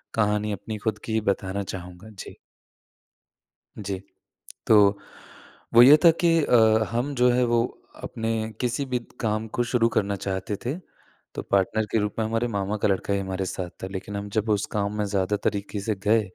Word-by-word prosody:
कहानी 105 -1 +1
अपनी 105 +3 -6
खुद 105 -1 0
की 110 - -4
ही 110 - +1
बताना 95 +1 -3
चाहूँगा। 90 +3 -9
जी। 100 -3 -10 1.4
जी, 100 -2 -4 0.7
तो 100 -2 +5 0.8
वो 120 - +9
ये 140 +5 +9
था 165 - +9
कि 170 - +5
अ, 125 - +3 0.4
हम 125 +5 -1
जो 125 0 +4
है 125 +1 +2
वो 120 0 +2 0.4
अपने 110 -1 -3
किसी 125 +3 -1
भी 125 -2 -1 0.2
काम 110 0 -1
को 120 - +3
शुरू 120 -1 +2
करना 100 -2 0
चाहते 95 +2 -3
थे, 130 +5 -1 0.6
तो - - -3
पार्टनर 100 +3 +1
के - - +2
रूप 105 0 -2
में 110 - +1
हमारे 115 +2 0
मामा 100 -1 -2
का 105 - +1
लड़का 100 0 0
ही 100 - +1
हमारे 95 0 -3
साथ 90 -1 -4
था 95 - -2
लेकिन 100 +1 -6
हम 100 0 -5
जब 110 +1 0
उस 105 -1 +1
काम 105 0 -2
में 105 - 0
ज़्यादा 100 0 0
तरीक़े 100 +1 -2
से 110 0 -1
गए, 110 +2 +4
105 Hz, 185 wpm, -25 LUFS, 100-115 Hz, 1.4 s, वो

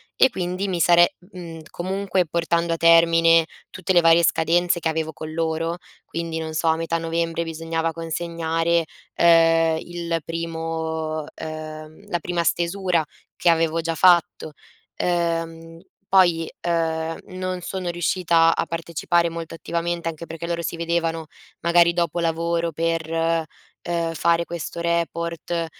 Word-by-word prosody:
e 260 - +5
quindi 185 -1 -3
mi 180 -2 -2
sare 175 +1 +5
mhmm, 175 -3 -10
comunque 190 0 -1
portando 170 +1 0
a - - -2
termine 165 0 +5 0.2
tutte 185 0 -3
le 175 - +6
varie 165 +1 +5
scadenze 175 +2 +2
che 165 - -2
avevo 160 -1 -2
con 155 +1 -7
loro, 165 +1 -1 0.3
quindi 165 -1 -4
non 160 0 -5
so 160 +1 -1
a 160 - +4
metà 165 0 -1
novembre 165 0 -1
bisognava 165 0 -2
consegnare, 165 0 -1 0.3
ehm, 165 -1 +5
il 170 -1 -3
primo, 160 -1 -3
ehm, 155 0 -8
la 175 - -1
prima 170 0 -2
stesura 175 0 0 0.3
che 175 - +2
avevo 165 0 +2
già 165 0 -2
fatto. 170 -3 +3 0.4
Ehm, 165 -1 -2 0.3
poi, 175 -4 +4
ehm, 165 -1 -1
non 185 -1 -4
sono 185 -1 -4
riuscita 170 -1 +2
a - - 0
partecipare 170 +1 0
molto 165 0 -7
attivamente, 170 0 -2
anche 165 +1 -7
perché 165 +1 -6
loro 170 0 -2
si - - -3
vedevano 165 -1 -1 0.4
magari 170 0 +4
dopo 170 -1 -1
lavoro 170 0 0
per, 165 0 -1 0.7
ehm, 170 -1 -2
fare 170 +1 +2
questo 170 0 -5
report. 170 0 -2
165 Hz, 135 wpm, -23 LUFS, 165-170 Hz, 0.7 s, le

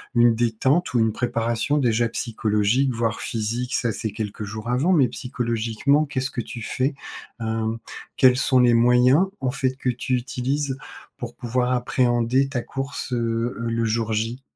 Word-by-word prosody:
une 120 -1 +5
détente 125 +8 +1
ou 120 - +3
une 110 0 +3
préparation 120 +3 0
déjà 120 -3 +2
psychologique, 115 +3 0
voire 115 -1 -1
physique? 120 +3 -3
Ca 120 -2 0
c'est 110 +1 -4
quelques 105 0 -5
jours 110 +3 -6
avant, 135 +9 +2
mais 140 -7 +5
psychologiquement, 120 +4 0
qu'est-ce 130 -2 -2
que 120 - -3
tu 115 - -8
fais? 130 +6 -1 0.5
Hem, 110 0 -2 0.4
quels 130 -1 +6
sont 130 -1 +3
les 120 -1 +5
moyens 125 +7 +5
en 130 -1 -1
fait 130 0 0
que 130 -1 -2
tu 125 +1 -1
utilises 135 +2 -2 0.4
pour - - -7
pouvoir 125 +1 -1
appréhender 125 +1 +2
ta 125 -3 -2
course, 135 +1 -5
heu, 115 0 -1
le 115 0 -1
jour 110 0 0
J? 115 +4 -2
120 Hz, 160 wpm, -23 LUFS, 115-130 Hz, 0.5 s, quels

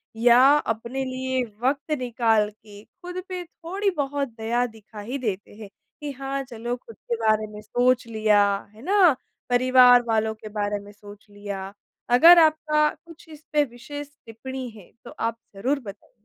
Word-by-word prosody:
या 235 +2 +5 0.2
अपने 235 +1 -3
लिए 260 0 -2 0.2
वक़्त 275 +4 -1
निकाल 225 -4 +1
के 210 -1 -16
खुद 360 0 -8
पे 365 -1 -4
थोड़ी 350 +4 -3
बहुत 285 0 -1
दया 235 +2 0
दिखा 220 -2 -12
ही 245 +7 -4
देते 210 -6 -4
हैं 210 -1 -10 0.3
कि 295 -1 -4
हाँ, 275 0 -4
चलो 240 -1 -5
खुद 235 -2 -14
के 235 - -4
बारे 215 -1 +1
में 210 0 -10
सोच 245 +3 +1
लिया, 215 -2 +3 0.3
है 215 - -16
ना? 365 -1 +4 0.3
परिवार 250 0 +6
वालों 220 -1 +1
के 215 0 -10
बारे 205 -1 -2
में 205 0 -13
सोच 205 0 -15
लिया। 200 -1 -7 0.4
अगर 330 +8 +8
आपका 310 -1 +3 0.2
कुछ 330 0 -15
इस 310 -1 -13
पे 300 -1 +4
विशेष 290 +4 -9 0.2
टिप्पणी 255 +3 -7
है, 215 -5 -15
तो - - -9
आप 230 0 -3 0.2
ज़रूर 260 +8 -1
बताइए? 205 -5 -12
245 Hz, 165 wpm, -24 LUFS, 215-275 Hz, 0.4 s, अगर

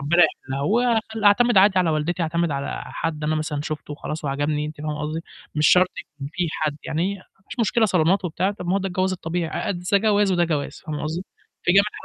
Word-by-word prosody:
ربّنا 165 +5 +4
يحلّها. 135 -3 -3
هو 210 +12 +2
أخل 225 -2 0
أعتمد 240 +3 +5
عادي 190 0 +5
على 175 -3 +3
والدتي، 160 +3 -1
أعتمد 170 +1 0
على 140 0 -3
حد 155 -2 -3
أنا 155 +1 +1
مثلًا 155 -1 -2
شُفته 150 0 -5
وخلاص 150 +1 -6
وعجبني، 145 +2 -1
أنتِ 150 0 -7
فاهمة 150 -1 -3
قصدي، 155 +2 -3 0.3
مش 150 0 +4
شرط 180 0 +6
يكون 140 -2 -8
في 175 -1 -1
حد، 155 -1 -2
يعني 175 +6 -1
ما 185 - -17 0.3
فيش - - -4
مشكلة 230 +1 +3
صالونات 185 -1 +2
وبتاع، 180 +3 0
طَب 200 -3 -7
ما 180 - +1
هو - - +3
ده 195 - -3
الجواز 185 +1 0
الطبيعي، 170 -1 -2
أأد 185 - -2
ز 180 - -5
ده - - +7
جواز 205 -1 +3
وده 175 -1 +3
جواز، 150 -4 -3
فاهمة 150 -2 -4
قصدي، 160 +4 -3 0.4
في - - +2
جميع 200 +2 +7
الحالات - - -11
170 Hz, 235 wpm, -23 LUFS, 150-190 Hz, 0.4 s, ده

